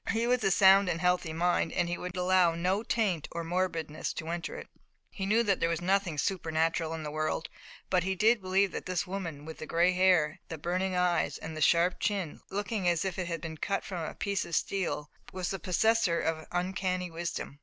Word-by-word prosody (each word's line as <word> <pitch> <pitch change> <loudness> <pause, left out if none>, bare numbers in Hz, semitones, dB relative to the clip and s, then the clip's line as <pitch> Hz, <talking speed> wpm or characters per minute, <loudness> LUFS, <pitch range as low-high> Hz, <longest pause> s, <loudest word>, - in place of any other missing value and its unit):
His 225 +3 +1
was 250 -1 +2
a 195 - +3
sound 195 0 +6
and 165 -1 -1
healthy 180 -2 +1
mind, 170 0 +1
and 175 - +1
he 175 - -1
would 180 +1 -6
allow 180 -2 +3
no 185 +4 0
taint 210 -9 0
of 170 0 -4
morbidness 165 -3 -2
to 160 - -6
enter 170 0 -4
it. - - -8 0.4
He 195 -1 -4
knew 225 +3 +3
that 200 -4 +1
there 165 - +1
was 170 - -1
nothing 185 -2 0
supernatural 165 -1 0
in 160 - -6
the 150 - -5
world, 155 +1 -2 0.4
but 180 -2 +2
he 190 +1 -1
did 220 +4 +3
believe 190 +1 +2
that - - -6
this 185 +1 -1
woman 170 -6 -5
with 160 0 -8
the 155 - -6
gray 170 +2 +3
hair, 180 -4 +3
the 160 - -5
burning 185 +4 -1
eyes 180 -1 +1
and 160 0 -7
the 155 - -5
sharp 170 +4 +3
chin, 195 -7 -2
looking 205 -1 -2
as 170 +1 +1
if 190 -1 -3
it 180 - -2
had 165 -2 -3
been 160 -1 -6
cut 195 +5 -1
from 180 -4 -4
a - - -5
piece 200 -2 -1
of 170 - -4
steel, 180 -6 -1 0.2
was 185 -1 -3
the 195 - -3
possessor 185 0 +2
of 160 -1 -2
uncanny 180 0 -1
wisdom. 165 -4 -5
180 Hz, 220 wpm, -30 LUFS, 165-190 Hz, 0.4 s, sound